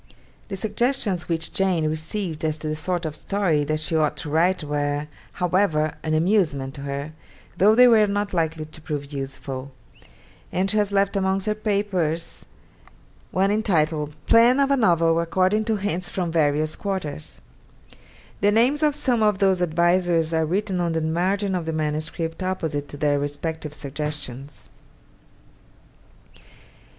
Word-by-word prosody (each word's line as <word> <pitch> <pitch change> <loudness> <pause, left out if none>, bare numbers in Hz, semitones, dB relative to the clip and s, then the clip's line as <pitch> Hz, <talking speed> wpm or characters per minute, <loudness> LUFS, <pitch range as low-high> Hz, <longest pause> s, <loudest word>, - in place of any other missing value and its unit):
The 195 - -5
suggestions 220 -3 -1
which 165 -1 -2
Jane 185 -5 +1
received 160 +2 -4
as 155 -1 0
to 155 - -6
the 155 - -1
sort 175 +3 -2
of 155 -1 -4
story 180 -6 0
that 155 +1 -1
she 155 +1 -2
ought 155 -2 +1
to 150 - -6
write 170 +2 +2
were, 145 0 -1 0.3
however, 175 -4 +1
an 155 0 -1
amusement 155 -7 +1
to 140 - -9
her, 140 +2 -4 0.5
though 210 +4 +5
they 250 +1 +8
were 220 -3 +5
not 205 0 -2
likely 160 -2 -1
to 155 +1 -14
prove 145 -2 -5
useful; 135 0 -5 0.8
and 190 +2 0
she 215 - 0
has 205 -1 +1
left 200 0 +1
amongst 190 0 0
her 215 - +1
papers 200 -6 -2 0.8
one 195 +2 +1
entitled, 155 -8 0
'Plan 235 +3 +5
of 275 0 +3
a - - +5
novel 170 -8 +3
according 185 +5 +1
to 220 -1 +1
hints 190 -3 -2
from 175 -3 -2
various 155 -1 +1
quarters.' 185 - -5 1.0
The 205 +1 +3
names 250 +7 +3
of 300 -2 +2
some 250 -6 0
of 210 -2 +3
those 190 -2 +2
advisers 170 -1 +2
are 160 -1 +1
written 190 +1 -1
on 170 -1 0
the 160 - 0
margin 185 +5 0
of 175 -3 -2
the 160 - -1
manuscript 155 +2 -3
opposite 160 -6 -2
to 145 - -9
their 145 -1 +1
respective 150 +2 -4
suggestions. 145 -2 -6
170 Hz, 155 wpm, -23 LUFS, 155-200 Hz, 1.0 s, they